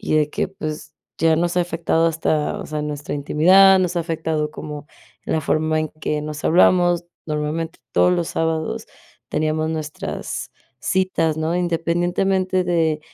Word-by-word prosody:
de 150 -1 +2
que, - - -1
pues, 155 -5 -6 0.3
ya 160 0 +3
nos 175 +1 0
ha - - +4
afectado 165 -1 +1
hasta, 155 -2 0
o - - -6
sea, 155 -1 -3
nuestra 150 -1 -4
intimidad, 185 +7 +6
nos 180 -1 0
ha - - +1
afectado 160 -2 -2
como 150 -1 -7 0.4
en - - -4
la 160 - +2
forma 155 +2 +1
en 155 - -1
que 150 -1 -3
nos 150 0 -6
hablamos, 175 0 +4 0.2
normalmente 155 +2 -3
todos 180 - +4
los 175 -2 -1
sábados 160 -1 -2 0.4
teníamos 155 +1 0
nuestras 155 -1 -5 0.3
citas, 175 -4 +1
¿no?, 160 +2 -1
independientemente 175 +2 0
de 165 -3 +1
160 Hz, 150 wpm, -21 LUFS, 155-175 Hz, 0.4 s, intimidad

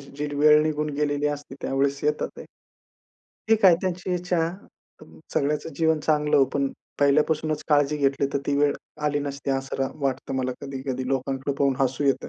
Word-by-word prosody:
जी 140 +1 -6
वेळ 150 +1 +6
निघून 150 -1 -1
गेलेली 145 0 0
असते 145 -2 -4
त्यावेळेस 140 +1 0
येतात 150 0 0
ते. - - -8 1.0
ठीक 220 -2 +3
आहे, 185 -3 +9
त्यांची 185 0 -2
इच्छा. 180 0 -1 0.6
अ, - - -12 0.3
सगळ्याचं 150 +2 0
जीवन 160 -1 +2
चांगलं 150 -1 +2
हो, 135 - +6
पण 140 -1 +1 0.3
पहिल्यापासूनच 150 +2 +2
काळजी 145 -1 +3
घेतली 140 -1 +1
तर - - +1
ती 145 - +1
वेळ 145 0 +3 0.3
आली 145 0 +1
नसती 140 -1 -4
असं 135 0 -2
राह 135 -1 0
वाटतं 135 0 -2
मला 130 -1 -1
कधी-कधी 130 -2 -4
लोकांकडे 135 +1 -1
पाहून 140 -1 +3
हसू 135 +2 0
येतं. 135 -1 +1
145 Hz, 170 wpm, -25 LUFS, 135-150 Hz, 1.0 s, आहे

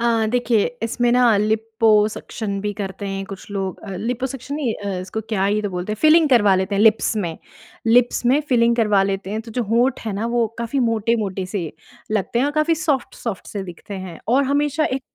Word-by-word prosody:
अ, 230 -2 +2
देखिए 240 -3 +2 0.2
इसमें 240 +1 +1
ना 245 -3 +5
लिपोसक्शन 215 -1 +1
भी 205 +1 -2
करते 200 -1 -5
हैं 195 0 -3
कुछ 195 +1 -10
लोग 195 -2 -3
अ, 200 - -7
लिपोसक्शन 255 +6 -4
नहीं 275 -7 -1
अ, 200 -3 -4
इसको 190 +4 -5
क्या 195 -4 0
ही 210 +2 +1
तो 205 - -1
बोलते 180 +3 -3
हैं? - - -4
फ़िलिंग 315 0 +6
करवा 205 -6 +5
लेते 190 +2 -1
हैं 200 - +2
लिप्स 220 0 +3
में। 170 -6 -3 0.5
लिप्स 240 +2 +3
में 275 +4 +4
फ़िलिंग 235 -2 +3
करवा 210 -4 +3
लेते 195 0 -2
हैं 215 +1 -2
तो 230 - -11
जो 245 +2 -1
होंठ 235 +5 +1
है 210 - -1
ना, 210 +4 -2
वो 235 -1 +1
काफ़ी 235 +4 -2
मोटे-मोटे 215 -4 -1
से 180 -4 -4 0.4
लगते 215 +3 0
हैं 260 - +2
और 290 - -2
काफ़ी 305 +2 +2
सॉफ्ट-सॉफ्ट 270 - -3
से 200 -2 -5
दिखते 180 +3 -9
हैं 170 -2 -9
और 265 +4 +3
हमेशा 295 +1 +1
एक 260 +1 -1
220 Hz, 205 wpm, -21 LUFS, 200-245 Hz, 0.5 s, फ़िलिंग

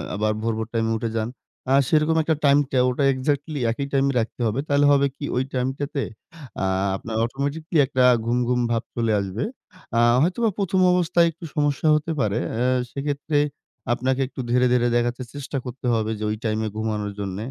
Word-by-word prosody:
আবার 110 +1 +1
ভোর, 115 0 0
ভোর 110 0 -3
টাইম 115 -1 +1
উঠে 115 +1 -2
যান। 110 +1 -1 0.4
আ - - +5
সেরকম 155 +1 +3
একটা 160 0 +1
টাইমটা 140 -1 +3
ওটা 135 +3 -1
এক্সাক্টলি 145 +3 -2
একই 140 +4 -3
টাইমে 135 0 +3
রাখতে 115 +2 -4
হবে। 110 +5 -1
তাহলে 145 0 +3
হবে 140 0 +4
কি? 145 - -4
ঐ - - 0 0.2
টাইমটাতে 135 +2 -2 0.6
আ - - +2 0.3
আপনার 110 +3 -6
অটোমেটিক্যালি 145 +6 -2
একটা 130 -1 +1 0.2
ঘুম, 120 +1 +1
ঘুম 125 0 +1
ভাব 115 +1 0
চলে 115 -2 +1
আসবে। 100 +2 -3 0.5
আ - - +4 0.2
হয়তোবা 215 +7 +2
১ম 190 -1 0
অবস্থায় 170 -1 +3
একটু 165 +2 -11
সমস্যা 145 +1 +1
হতে 160 +2 -1
পারে। 105 -1 +1 0.2
এ্যা 125 +1 +1 0.2
সেক্ষেত্রে 145 +1 -2 0.6
আপনাকে 130 +2 0
একটু 135 - -12
ধীরে, 125 +1 +3
ধীরে 120 -1 +3
দেখা 120 0 +2
যাচ্ছে 130 - -5
চেষ্টা 140 0 -4
করতে 125 +1 -7
হবে 110 -1 0
যে - - -4
ওই 105 - -1
টাইম 110 0 0 0.2
ঘুমানোর 105 -2 -2
জন্য। 95 -1 -4
130 Hz, 185 wpm, -23 LUFS, 115-145 Hz, 0.6 s, আ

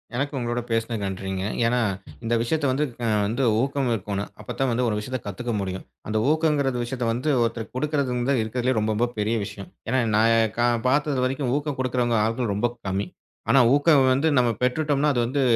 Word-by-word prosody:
எனக்கு 145 +3 -1
உங்களோட 120 0 -1
பேசினது 115 0 -1
நன்றிங்க. 95 0 -3 0.2
ஏன்னா 120 +2 +2 0.4
இந்த 115 +1 -1
விஷயத்தை 145 +5 0
வந்து 145 +3 +1 0.4
வந்து 115 +6 -1 0.2
ஊக்கம் 135 -1 0
இருக்கணும். 100 -1 -3
அப்பத்தான் 130 +5 -2
வந்து 125 +2 0
ஒரு 105 - -1
விஷயத்தைக் 125 +2 -5
கத்துக்க 120 +5 -4
முடியும். 95 -1 -4 0.2
அந்த 110 - -1
ஊக்கங்கற 150 -4 +2
விஷயத்தை 120 -1 -3
வந்து 125 +6 -2
ஒருத்தருக்கு 115 -1 -4
கொடுக்கிறது 145 -2 0
இருந்தா 125 +3 +1
இருக்கறதுல 125 +3 -1
ரொம்ப, 105 0 0
ரொம்ப 120 +3 +2
பெரிய 105 +2 0
விஷயம். 100 -2 -8 0.2
ஏன்னா 130 +2 +2 0.2
நான் 115 0 +3 0.3
பார்த்தது 145 +1 +2
வரைக்கும் 130 0 -1
ஊக்கம் 145 -2 -3
கொடுக்குறவங்க 125 -2 +1
ஆட்கள் 115 -1 -1
ரொம்ப 115 +4 +1 0.2
கம்மி. 95 +1 -1 0.4
ஆனா 135 +3 +6 0.2
ஊக்கம் 145 -3 +4
வந்து 140 +5 +1
நம்ம 120 -1 +4
பெற்றுட்டோம்னா 145 +2 +2
அது 120 - +1
வந்து 135 +4 -1
125 Hz, 175 wpm, -24 LUFS, 110-135 Hz, 0.4 s, ஆனா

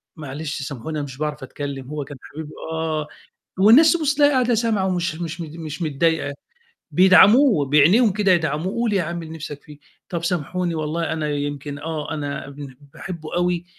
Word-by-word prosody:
"معلش 150 -1 -5
سامحوني 140 +3 -5
أنا 145 - -3
مش 135 -2 -10
باعرف 150 -1 -3
أتكلم 135 -1 -6
هو 150 -1 -4
كان 140 +1 -10
حبيبي 155 0 -9 0.2
آه"، 160 -2 -2 0.5
والناس 235 +12 +7
تبُص 310 -4 +1
تلاقيها 290 0 +4
قاعدة 250 -2 +2
سامعة 220 -4 +1
ومش 180 -2 -1
مش 170 0 -5
مت 160 -2 -7
مش 160 0 -6
متضايقة، 155 -1 0 0.6
بيدعموه 190 - +6
بعينيهم 165 - +5
كده 200 -1 +2
يدعموه 175 +5 0
قُل 225 -3 +1
يا 190 -4 +2
عم 170 +1 -4
اللي 160 0 -8
نِفْسك 150 -2 -7
فيه 150 -1 -13 0.3
"طَب 170 -2 -3
سامحوني 175 0 -1
والله 160 +1 -2
أنا 155 -2 -2
يمكن، 145 0 -4
آه، 155 0 -4
أنا 140 -2 -4
بن 140 -2 -10 0.2
باحبه 170 -4 -7
أوي 175 -1 0
160 Hz, 175 wpm, -22 LUFS, 145-185 Hz, 0.6 s, والناس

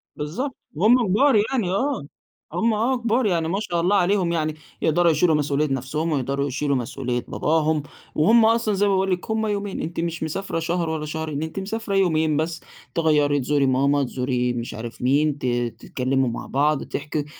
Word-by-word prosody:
بالضبط، 220 - -4 0.2
وهُم 225 +7 +4
كبار 260 +7 +4 0.2
يعني، 215 -9 0
آه، 255 - 0 0.5
هُم 225 +6 +1
آه 240 +5 +1
كبار 235 +1 +1
يعني 170 -5 +1
ما 195 +4 -1
شاء 175 -5 -1
الله 190 +4 +2
عليهم 185 -2 +2
يعني، 155 -2 -1 0.3
يقدَروا 170 +1 +3
يشيلوا 160 0 +3
مسؤولية 145 0 +1
نَفْسهم، 150 +5 -2
ويقدَروا 140 0 -1
يشيلوا 140 +1 -1
مسؤولية 125 0 -3
باباهم، 155 -1 +1 0.3
وهُم 220 +9 +5
أصلًا 225 -2 +2
زَي 200 +1 +2
ما 200 - +2
باقول 190 0 +1
لِك، 180 +4 -2
هُم 220 0 0
يومين، 205 -1 -3
أنتِ 165 +1 -4
مش 165 -1 -2
مسافرة 165 +2 -3
شهر 170 0 -1
والّا 155 -1 -3
شهرين، 155 -1 -3
أنتِ 160 +4 -5
مسافرة 205 +1 -3
يومين 160 -5 +2
بس، 160 0 -2 0.3
تغيّري، 150 -3 +3
تزوري 140 +1 +1
ماما، 140 +2 +2
تزوري 125 -1 -1
مش 120 0 -5
عارف 115 +2 -7
مين، 145 +3 +2
ت 130 - -6 0.3
تتكلموا 130 0 0
مع 115 - -5
بعض، 145 +1 +1
تحكي، 150 0 -4
160 Hz, 180 wpm, -23 LUFS, 145-195 Hz, 0.5 s, وهُم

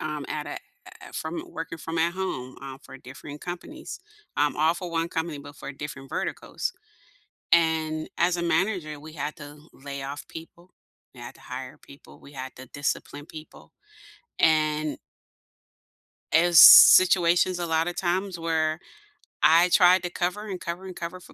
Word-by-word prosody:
um, 150 -2 -4
at 150 -1 -4
at - - -6 0.5
a - - -16
from 160 +2 -4
working 165 0 -7
from 165 +2 -5
at 165 +1 +1
home, 130 -10 -5
uh, 135 -1 -8
for 135 - -12
different 140 +3 -11
companies 305 - -8 0.4
um, 145 0 +1
all 160 +2 +2
for 180 -1 -7
1 165 0 -1
company, 160 -2 -4
but 145 0 -12
for 140 - -8
different 140 -1 -9
verticals. - - -4 0.8
And 160 -2 +2
as 175 +1 +2
a 175 - -3
manager, 170 -3 -1
we 155 +1 -11
had 150 0 -5
to 145 -1 -11
lay 140 0 -8
off 140 +1 -7
people, 170 +2 -12 0.4
we - - -13
had - - -9
to - - -21
hire - - -8
people, 70 - -16
we 140 - -15
had 130 -1 -8
to 130 - -11
discipline 145 0 -4
people, 155 0 -13 0.7
and 155 -2 +2 1.3
as 170 0 +5
situations 180 0 +8
a 175 - -3
lot 160 +1 0
of 175 - -5
times 185 +1 -2
where 160 -1 -1 0.6
I 165 +4 +6
tried 180 +1 +5
to 175 - -2
cover, 185 +5 -3
and 185 -2 -5
cover, 170 +3 -6
and 185 -2 -8
cover 170 +2 -6
for 180 - -17
160 Hz, 165 wpm, -25 LUFS, 150-175 Hz, 1.3 s, situations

